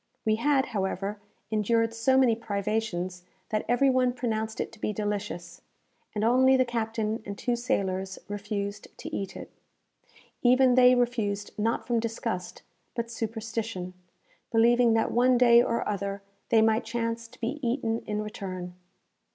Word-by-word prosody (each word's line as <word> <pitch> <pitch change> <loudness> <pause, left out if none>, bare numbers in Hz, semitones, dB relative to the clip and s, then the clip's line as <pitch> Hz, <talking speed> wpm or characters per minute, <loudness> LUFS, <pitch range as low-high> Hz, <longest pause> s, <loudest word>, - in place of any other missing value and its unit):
We 215 0 +2
had, 270 +2 +2
however, 200 -1 -2 0.3
endured 225 +2 +1
so 245 +4 +2
many 250 -4 +5
privations 200 -4 -2 0.3
that 215 -1 0
every 265 +3 +4
one 255 -1 +2
pronounced 220 -3 -2
it - - -2
to 225 - -16
be 215 - -1
delicious, 200 -5 -4 0.5
and 210 - -1
only 260 +3 +5
the 255 - +3
captain 225 -2 -2
and 200 -1 -6
two 245 -1 0
sailors 190 -6 -1
refused 205 0 -4
to - - -6
eat 195 - -4
it. - - -9 0.9
Even 255 +1 +5
they 250 0 +7
refused 220 -5 -1
not 225 +2 -1
from 240 -2 +1
disgust, 225 -5 -4 0.3
but 235 -1 -3
superstition, 225 -4 -4 0.6
believing 235 +1 +4
that 225 0 +1
one 250 +1 +4
day 235 -1 +7
or 235 -1 -1
other 200 -1 -3 0.3
they 225 -1 +5
might 220 +1 +3
chance 230 0 -3
to 250 - -19
be 255 +6 -3
eaten 230 -2 0
in 210 0 -2
return. 185 -4 -6
225 Hz, 150 wpm, -28 LUFS, 205-240 Hz, 0.9 s, they